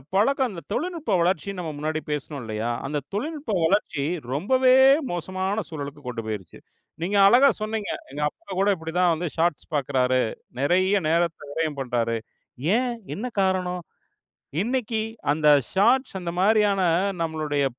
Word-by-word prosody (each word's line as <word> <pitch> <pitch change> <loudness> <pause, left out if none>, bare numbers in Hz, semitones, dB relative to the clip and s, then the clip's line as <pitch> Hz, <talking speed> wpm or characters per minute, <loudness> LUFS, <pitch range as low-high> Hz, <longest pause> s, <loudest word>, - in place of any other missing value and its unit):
பழக்கம் 250 +1 +2 0.2
தொழில்நுட்ப 325 0 -2
வளர்ச்சின்னு 185 +2 0
நம்ம 160 -3 -4
முன்னாடி 155 +1 -2
பேசினோம் 145 -1 -4
இல்லையா, 110 +1 -3 0.2
அந்த 150 +1 -2 0.2
தொழில்நுட்ப 285 +1 -3
வளர்ச்சி 160 -6 +1 0.3
ரொம்பவே 255 - +4 0.4
மோசமான 185 +4 -2
சூழலுக்கு 145 -2 -7
கொண்டு 115 -2 -4
போய்டுச்சு. 105 -6 -6 0.4
நீங்க 200 +3 0
அழகா 255 +7 +7
சொன்னீங்க. 215 -1 -2 0.2
"எங்க 145 +2 -5
அப்பா - - -26
கூட 200 - +3
இப்படி 160 -2 -7
தான் 180 -1 +4
வந்து 170 +2 -2
ஷார்ட்ஸ் 165 -2 0
பார்க்கிறாரு. 130 -2 +1 0.4
நிறைய 185 +7 +3
நேரத்தை 170 -2 +1
விரயம் 155 -2 -2
பண்ணுறாரு." 115 -3 -1 0.6
ஏன் 250 +1 +1 0.2
என்ன 220 - -4 0.2
காரணம் 185 -2 0 0.8
இன்றைக்கு 230 -2 -1 0.3
அந்த 150 0 +2 0.2
ஷார்ட்ஸ் 255 +7 +3
அந்த 175 - -3
மாதிரியான 205 -1 +3 0.4
நம்முடைய 155 -3 -1
180 Hz, 130 wpm, -24 LUFS, 150-210 Hz, 0.8 s, அழகா